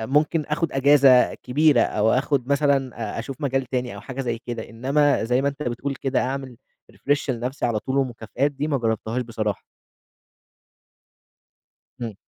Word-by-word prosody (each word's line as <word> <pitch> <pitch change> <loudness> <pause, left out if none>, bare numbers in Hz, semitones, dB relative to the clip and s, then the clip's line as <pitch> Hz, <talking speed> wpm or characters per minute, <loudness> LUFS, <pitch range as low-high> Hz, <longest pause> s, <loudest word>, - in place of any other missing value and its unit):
ممكن 150 +6 +1
آخد 155 +1 -1
أجازة 135 -2 +5
كبيرة، 145 0 +3
أو 110 0 +2
آخد 135 0 0
مثلًا 140 -2 +2 0.3
أ - - -4
أشوف 135 +3 -6
مجال 135 -2 0
تاني 125 -3 -3
أو 100 - -8
حاجة 130 +4 -6
زَي 120 -3 -2
كده. 120 -2 -5
إنما 135 +3 +1
زَي 125 +3 +1
ما 140 - +2
أنت 140 +1 -5
بتقول 130 +3 -3
كده، 135 0 -1
أعمل 130 -1 -4 0.4
refresh 140 +9 -1
لنَفْسي 125 +3 -2
على 115 -2 0
طُول 130 +5 -3
ومكافآت، 125 +2 -1
دي 145 +2 -3
ما 140 - +1
جربتهاش 115 +1 -1
بصراحة. 110 -3 -3 2.4
إمم. 115 -3 -4
130 Hz, 155 wpm, -23 LUFS, 120-140 Hz, 2.4 s, أجازة